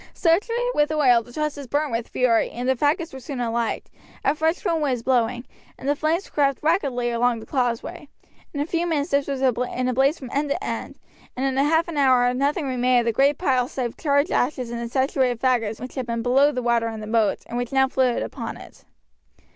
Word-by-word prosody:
Saturated 460 +8 +1
with 295 0 +2
oil, 260 -6 +4
the 245 - -15
trusses 290 0 -3
burnt 290 +2 -1
with 230 0 -2
fury, 240 -3 +2
and 245 +1 -5
the 260 - +4
faggots 315 - 0
were 265 - -7
soon 265 +1 -6
alight. 235 -1 -2 0.4
A 275 - +4
fresh 320 +7 -1
wind 335 -3 +1
was 255 -5 -1
blowing, 245 -1 +1 0.3
and 265 - -8
the 290 - +2
flames 320 +6 -1
crept 275 -2 0
rapidly 275 -8 +1
along 235 0 +1
the 220 - -10
causeway. 245 +1 -2 0.4
In 285 - -5
a - - 0
few 340 +1 -1
minutes 300 -3 -1
this 280 0 +1
was 275 -2 -3
in 250 0 0
a 255 - 0
blaze 270 +5 +2
from 260 -2 -9
end 285 +1 0
to 355 +8 -2
end, - - -5 0.4
and 260 - -1
in 270 0 +1
half 320 +3 +2
an 335 -3 -5
hour 255 -3 +4
nothing 280 +4 0
remained 250 -1 +2
of - - -5
the 230 - +1
great 280 +3 +3
pile 255 -8 +1
save 245 -3 -4
charred 285 +1 +1
ashes 250 -2 0
and 235 0 -4
the 235 - -4
saturated 260 -2 +1
faggots 230 -4 0
which 255 - -7
had 260 -3 -4
been 230 -1 -2
below 270 +4 +4
the 250 -3 -3
water 235 -1 +2
in 225 -1 -5
the 215 - -6
moat, 220 -1 +1
and - - -7
which 245 0 -2
now 265 0 +3
floated 255 -2 +1
upon - - -6
it. - - -15
265 Hz, 225 wpm, -23 LUFS, 245-295 Hz, 0.4 s, oil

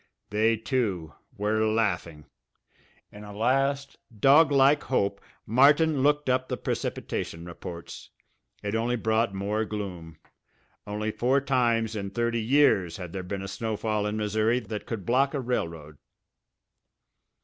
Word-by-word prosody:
They, 110 +2 +2
too, 105 - -2 0.2
were 105 +2 +1
laughing! 95 -9 -1 0.9
In 105 0 -11
a 105 - -9
last 135 +4 0
doglike 140 +4 +5
hope 100 -6 0 0.2
Martin 145 +5 +4
looked 145 +1 +2
up 130 0 +1
the - - -3
precipitation 85 +1 -4
reports. 85 0 -9 0.5
It 100 0 -3
only 115 +2 0
brought 110 -2 0
more 105 +3 -1
gloom. 90 -7 -6 0.7
Only 105 +1 -2
four 130 +5 +2
times 120 -5 +1
in 100 -2 -3
thirty 115 +2 -1
years 110 - +3
had 90 -2 -8
there 95 - -3
been 95 +2 -5
a - - -5
snowfall 105 0 -2
in 105 +1 -2
Missouri 110 +3 +1
that 105 -2 -7
could 110 -6 -5
block 135 +4 +2
a - - 0
railroad! 85 - -4
110 Hz, 130 wpm, -27 LUFS, 100-125 Hz, 0.9 s, doglike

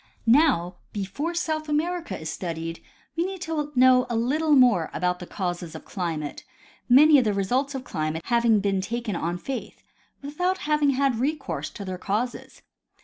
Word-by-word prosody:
Now, 230 - +3 0.2
before 245 - -3
South 315 -3 -2
America 335 +3 -1
is 160 - -7
studied, 165 -1 -5 0.3
we 335 - +1
need 380 +1 -4
to 305 -4 -3
know 255 0 +5
a 235 - -1
little 295 +7 +1
more 245 - +5
of 180 +2 0
the 180 - -8
causes 175 -4 -4
of - - -9
climate, 160 -5 -4 0.5
many 290 +4 +7
of - - +2
the 210 -3 0
results 255 +8 0
of 260 - -4
climate 155 -6 -3
having 235 -3 +3
been 195 -1 0
taken 230 0 -3
on 170 +1 -2
faith, 265 +7 -6 0.4
without 360 +7 -1
having 300 -1 +2
had 270 -4 +1
recourse 280 +1 -2
to 200 - -8
their 185 -1 -5
causes. 220 +6 -3
245 Hz, 165 wpm, -25 LUFS, 185-295 Hz, 0.5 s, many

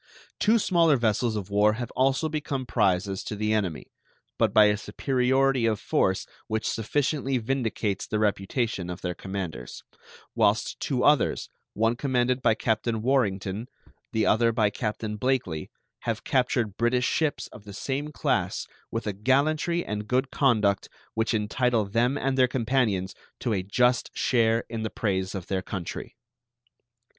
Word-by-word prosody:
Two 220 +2 +4
smaller 170 -8 +3
vessels 115 0 +1
of 100 -2 -5
war 105 +1 +4
have 120 +1 -5
also 135 +4 +1
become 145 -4 -3
prizes 95 -3 +1
to - - -5
the 105 +1 0
enemy, 95 -8 -2 0.5
but - - +3
by 105 - +7
a 105 0 +4
superiority 130 +2 +1
of 110 -2 0
force - - +1 0.2
which 110 0 -1
sufficiently 135 +3 0
vindicates 110 -5 -2
the 105 - -1
reputation 105 -1 -1
of 90 +1 -6
their 90 -1 -2
commanders, 90 -8 -6 0.5
whilst 105 +3 +1
two 130 -3 -1
others, 145 -3 +3 0.3
one 115 +2 +2
commanded 125 -1 0
by 115 -3 +3
Captain 110 0 -1
Warrington, 110 -4 0 0.4
the 110 -2 +1
other 115 +1 +3
by 110 -3 +2
Captain 105 0 -3
Blakely, 120 -11 -1 0.3
have - - -3
captured 120 -5 0
British 120 +1 +2
ships 145 -6 0
of 100 - -12
the 100 - -9
same 140 +8 -3
class - - -1 0.2
with 115 -1 -3
a 105 - -1
gallantry 150 - +1
and 105 0 -4
good 130 +3 0
conduct 105 -8 +2 0.2
which 110 0 0
entitle 110 +1 +1
them 120 +7 +1
and 135 -1 -1
their 130 - +6
companions 115 -7 0 0.3
to 120 - -1
a 95 - 0
just 125 +6 +2
share 115 -2 +2
in 115 -1 -5
the 110 - -2
praise 95 -3 -2
of 95 -3 -5
their 95 -1 -1
country. 90 -2 -6
115 Hz, 150 wpm, -26 LUFS, 105-130 Hz, 0.5 s, by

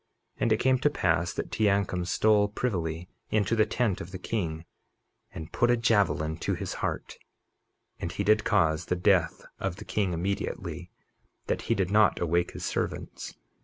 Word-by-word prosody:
51:34 - - -21
And 115 - +2
it 110 - +4
came 130 0 +3
to 150 - +3
pass 90 - +1
that - - -4
Teancum 100 -4 +1
stole 105 +3 +3
privily 90 -6 -2 0.2
into 110 +2 +1
the 110 -1 +3
tent 115 -7 0
of 85 - -7
the 95 - -6
king, 85 -5 -3 0.7
and 80 +1 -8
put 120 - +2
a 120 - +4
javelin 100 -9 +2
to - - -1
his - - -4
heart; - - -3 0.8
and 85 - -3
he 100 - -2
did 105 +2 +4
cause 80 -6 +2
the 90 - 0
death 90 -2 +2
of 95 -2 -2
the 105 +2 -10
king 100 -3 0
immediately 90 -1 -3 0.6
that - - -1
he 115 - +4
did 95 -2 0
not 105 -1 +4
awake 85 +1 0
his - - -5
servants. - - -4
95 Hz, 175 wpm, -28 LUFS, 85-110 Hz, 0.8 s, it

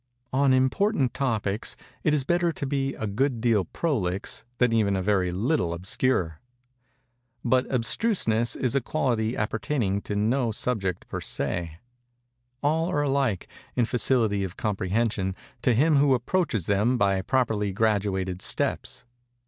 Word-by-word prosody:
On 135 0 +3
important 130 - +2
topics 110 -6 -1 0.3
it 155 - +3
is 150 -3 +2
better 175 +3 +1
to 145 - -4
be 135 0 -1
a - - -4
good 120 +5 0
deal 110 -5 +2
prolix 100 - -2
than 125 -2 +3
even 105 -3 +2
a 95 - -1
very 95 -3 +1
little 95 - 0
obscure. 90 -2 0 1.1
But 125 +1 +2
abstruseness 120 - +1
is 125 -3 -1
a 140 - +2
quality 120 -5 -1
appertaining 105 -2 -1
to 105 - -4
no 115 +4 +1
subject 100 -6 -2
per - - -5
se. 80 +4 -3 0.9
All 160 +4 +1
are 145 - +1
alike, 135 -8 0 0.3
in 120 - +3
facility 115 -4 +1
of 90 -2 -6
comprehension, 100 -1 -1 0.3
to 120 - +3
him 150 +5 +4
who 140 -1 +4
approaches 125 - -1
them 105 +5 +2
by 100 -3 +2
properly 105 -3 0
graduated 95 -3 0
steps. - - -2
115 Hz, 140 wpm, -26 LUFS, 100-135 Hz, 1.1 s, him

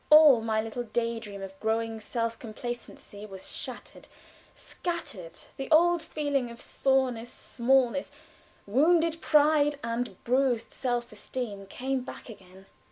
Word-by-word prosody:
All 300 -6 +9
my 220 -1 0
little 225 +2 -4
day 230 0 -1
dream 200 -3 -8
of 195 0 -9
growing 225 0 -1
self 230 +1 -2
complacency 230 -2 -7
was 190 -2 -10
shattered, - - -8 0.5
scattered; 250 - -5 0.2
the 270 - -5
old 340 +2 +5
feeling 285 -5 -1
of 235 0 -10
soreness, 255 -3 0
smallness, 260 +2 +1 0.6
wounded 325 +8 +3
pride, 295 -1 +4
and 230 -4 -2
bruised 250 -2 +1
self 245 -2 -2
esteem 210 -2 -5
came 260 +5 -2
back 250 - -9
again. 190 -3 -13
240 Hz, 125 wpm, -28 LUFS, 220-275 Hz, 0.6 s, All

